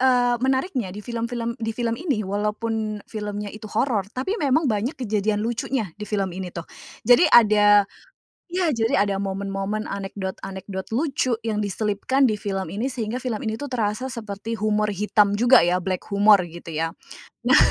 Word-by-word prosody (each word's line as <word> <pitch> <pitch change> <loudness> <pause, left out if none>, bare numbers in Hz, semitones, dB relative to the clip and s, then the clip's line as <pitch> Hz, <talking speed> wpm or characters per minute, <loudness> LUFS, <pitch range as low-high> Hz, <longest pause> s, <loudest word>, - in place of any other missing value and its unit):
eee, 245 -2 +4
menariknya 260 - 0
di 210 - -7
film-film 235 +1 -3
di 225 0 -3
film 230 0 -1
ini 280 -8 -1
walaupun 210 +2 -2
filmnya 210 -1 -4
itu 215 +2 -10
horor, 220 -4 +1
tapi 275 - -2
memang 295 - +2
banyak 225 +5 0
kejadian 215 -3 -1
lucunya 230 0 -1
di 210 - -6
film 195 -3 -2
ini 185 -2 -5
tuh. 170 -1 -7 0.4
Jadi 250 +8 +7
ada 205 -3 +6 0.6
ya, 355 -2 +1
jadi 225 -2 +1
ada 200 -1 -1
momen-momen 195 +2 -3
anekdot-anekdot 190 -1 -5
lucu 260 -3 0
yang 215 -2 -1
diselipkan 210 +6 0
di 215 -5 +2
film 195 -2 -3
ini 215 +6 -2
sehingga 235 -2 -3
film 235 -4 -3
ini 220 0 -3
tuh 285 - -4
terasa 230 0 -1
seperti 225 -2 -5
humor 215 0 +1
hitam 205 +1 +2
juga 245 +4 +6
ya, 180 +2 +2
black 185 0 -3
humor 200 -1 +6
gitu 170 0 -10
ya. 165 +2 -2 0.5
Nah, - - +6
215 Hz, 165 wpm, -23 LUFS, 200-240 Hz, 0.6 s, Jadi